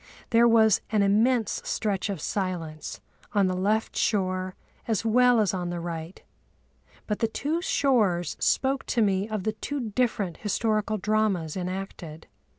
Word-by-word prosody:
There 235 0 +6
was 220 -3 +5
an 210 -2 +2
immense 220 +4 +2
stretch 205 -2 -1
of 195 -4 -3
silence 170 -6 -4 0.3
on 200 -2 +3
the 185 0 0
left 210 +4 0
shore 185 -3 0 0.3
as 225 -1 0
well 245 +1 +5
as 210 -3 +2
on 180 -2 -2
the 175 0 -3
right, 170 +1 -6 0.8
but 210 - -2
the 225 - +2
two 300 +9 -2
shores 210 - +1
spoke 270 +1 +1
to 235 - +2
me 195 +1 +1
of 215 -3 -3
the 215 - -1
two 245 0 -4
different 205 -7 0
historical 215 0 0
dramas 200 -6 0
enacted. 180 -4 -6
210 Hz, 150 wpm, -26 LUFS, 185-225 Hz, 0.8 s, There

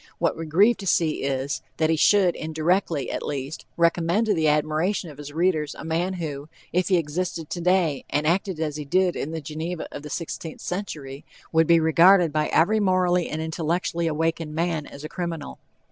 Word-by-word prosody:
What - - +1
we 165 0 -6
grieve 205 +9 +4
to 195 - -7
see 165 -3 +1
is, 135 0 -2 0.2
that 160 0 +2
he - - +3
should, 185 +2 +4
indirectly 160 -1 -1
at - - -3
least, 140 +1 -5
recommend 170 +5 +2
to 215 - +2
the 160 -4 +1
admiration 155 +4 0
of 145 - -15
his 145 0 -8
readers 160 -2 0
a - - -9
man 170 +4 -1
who, 150 -4 -5 0.2
if 180 +1 +1
he 185 - +4
existed 165 0 -3
today 175 -5 +1
and 150 +1 0
acted 180 +1 0
as 155 -2 -2
he 150 - -4
did 180 +5 +1
in 145 - -3
the 160 0 -4
Geneva 160 +4 -5
of - - -7
the 150 - -9
sixteenth 165 0 -5
century, 150 -8 -5 0.3
would 160 -1 +3
be 170 -1 +6
regarded 170 +1 +5
by 155 -1 +1
every 210 +7 +3
morally 180 -3 +2
and 160 +1 -3
intellectually 165 +1 -1
awakened 160 0 -1
man, 165 -2 -1
as 140 - -11
a - - -4
criminal. 170 -3 -5
165 Hz, 190 wpm, -24 LUFS, 150-180 Hz, 0.3 s, be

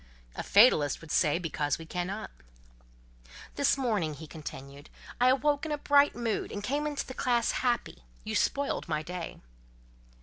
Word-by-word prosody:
"A - - -3
fatalist 195 - +5
would 165 - -10
say—because 155 -2 +1
we 165 - -10
cannot." 185 +5 -4 1.2
"This 280 - +2
morning," 210 - 0
he 160 - -9
continued, 145 -2 -9 0.3
"I 250 - +4
awoke 285 +2 +2
in 315 - -3
a 295 - 0
bright 285 0 +4
mood, 230 -3 -2
and 205 - -5
came 285 +6 -1
into 285 -3 -4
classe 240 -2 +1
happy; 240 - -1 0.2
you - - -5
spoiled 280 0 0
my 155 -1 -1
day." 175 +1 -6
210 Hz, 145 wpm, -29 LUFS, -, 1.2 s, fatalist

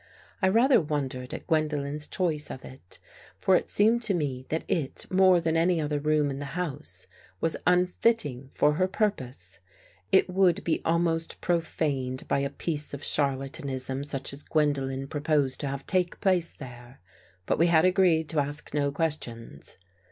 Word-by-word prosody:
I 190 - +3
rather 235 +6 +4
wondered 135 -5 -3
at - - -7
Gwendolen's 150 -2 -1
choice 155 -5 -1
of 130 - -8
it, 130 -9 -9 0.4
for - - +3
it - - 0
seemed 225 +3 +3
to 200 -5 +3
me 135 -5 -3
that 160 - -1
it, 145 -6 -2
more 185 -1 +5
than 165 -1 -1
any 170 +1 +2
other 150 -1 -1
room 150 -1 +1
in 135 - -5
the 145 +3 -6
house, 145 - -3 0.3
was 165 - +2
unfitting 180 - +1
for 150 - +2
her 185 +4 +1
pur 210 +2 +1
pose. 120 - -8 0.5
It 190 - +5
would 185 -1 +2
be 165 - 0
almost 165 0 +1
profaned 145 -6 -1
by - - +1
a 140 0 -1
piece 150 0 -2
of 145 - -10
charlatanism 135 -1 0
such 140 -2 0
as 140 - -5
Gwendolen 135 -4 -1
proposed 145 -3 0
to 145 - -3
have 135 0 -5
take 180 -2 0
place 180 -3 +1
there. 125 -1 -11 0.5
But - - 0
we 170 - +5
had 165 0 +4
agreed 180 -4 +3
to 160 - 0
ask 145 0 -4
no 145 -1 +1
questions. 130 - -3
150 Hz, 165 wpm, -27 LUFS, 135-175 Hz, 0.5 s, more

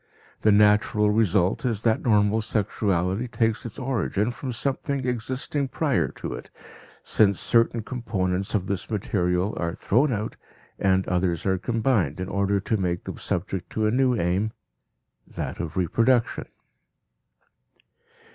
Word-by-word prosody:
The 105 - +4
natural 105 0 +4
result 100 -3 +2
is 115 -5 -1
that 110 -1 +2
normal 105 -1 +3
sexuality 100 -1 0
takes 115 -1 0
its 110 - -9
origin 120 -4 -1
from 125 +2 -5
something 135 +2 -2
existing 130 +4 -2
prior 130 - 0
to - - -6
it, - - -8 0.5
since 100 -3 +3
certain 115 -1 +2
components 100 -6 -2
of 95 -3 0
this 100 -1 -3
material 95 -2 0
are 85 +1 -2
thrown 130 +7 +2
out 110 -1 -3 0.4
and 95 0 +2
others 90 -2 0
are 95 -1 +1
combined 110 - 0
in 95 0 -4
order 100 0 +1
to 110 +3 -1
make 90 -3 -1
them - - -7
subject 90 0 -3
to 110 - 0
a 105 - +2
new 130 +1 +3
aim 95 +5 0 0.7
that - - -5
of 85 +2 -4
reproduction. 115 +7 +1
105 Hz, 135 wpm, -25 LUFS, 95-115 Hz, 0.7 s, The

